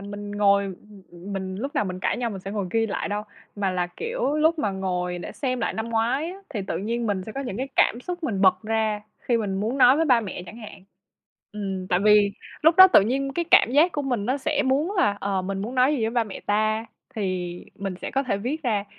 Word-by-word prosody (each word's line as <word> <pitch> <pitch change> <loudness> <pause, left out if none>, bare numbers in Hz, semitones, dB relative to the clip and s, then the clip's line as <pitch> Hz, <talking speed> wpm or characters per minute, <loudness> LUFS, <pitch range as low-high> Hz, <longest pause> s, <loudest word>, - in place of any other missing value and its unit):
mình 205 +1 -7
ngồi 200 -1 +3
ừm, 195 +1 -10
ừm, 175 +3 -9
mình 190 -1 -4
lúc 275 +7 -5
nào 210 - +1
mình 185 -1 -5
cãi - - 0
nhau 240 -2 -2
mình 195 -3 -6
sẽ 195 - -7
ngồi 200 -2 -2
ghi 225 0 +1
lại 205 - -3
đâu, 205 +1 -2 0.3
mà 195 -2 0
là, 180 -1 -1
kiểu, 460 - -2
lúc 320 +2 +3
mà 210 -9 0
ngồi 180 -2 -2
để - - -7
xem 255 -3 -2
lại - - -1
năm 220 +1 -3
ngoái 235 +8 0
á, 370 - -9
thì 215 -8 -3
tự 190 - -3
nhiên 230 +3 -2
mình 200 -3 -1
sẽ 220 - -7
có 275 - -4
những 245 -7 -5
cái 265 +2 -3
cảm 235 - +3
xúc 355 +5 -6
mình 200 -8 -1
bật 185 -1 +4
ra 220 -1 0 0.2
khi 240 - +1
mình 200 -3 -2
muốn 235 +6 -2
nói 260 +1 +7
với 325 - +2
ba 245 -4 +5
mẹ 190 -4 -6
chẳng 215 - -10
hạn. 210 -4 -11 0.7
Ừm, 195 -3 -4
tại 180 - +2
vì 210 -1 +6 0.3
lúc 325 +3 +5
đó 375 0 +10
tự - - +9
nhiên 270 +6 -1
cái 340 +4 -1
cảm 370 -10 +6
giác 320 +6 +4
của 290 - -2
mình 245 -6 -2
nó 260 - +1
sẽ 290 +1 0
muốn 295 +9 +1
là 205 - +2
"Ờ, 195 -2 -1
mình 195 +1 -3
muốn 235 +4 -5
nói 260 +3 +4
gì 270 - -2
với 220 - +1
ba 235 -1 +1
mẹ 205 - -8
ta?" 215 +2 0 0.3
thì 185 -4 -2 0.2
mình 195 -2 -5
sẽ - - -4
có 270 - 0
thể 235 -7 -1
viết 275 +9 -3
ra. 210 -5 0
215 Hz, 260 wpm, -24 LUFS, 195-260 Hz, 0.7 s, đó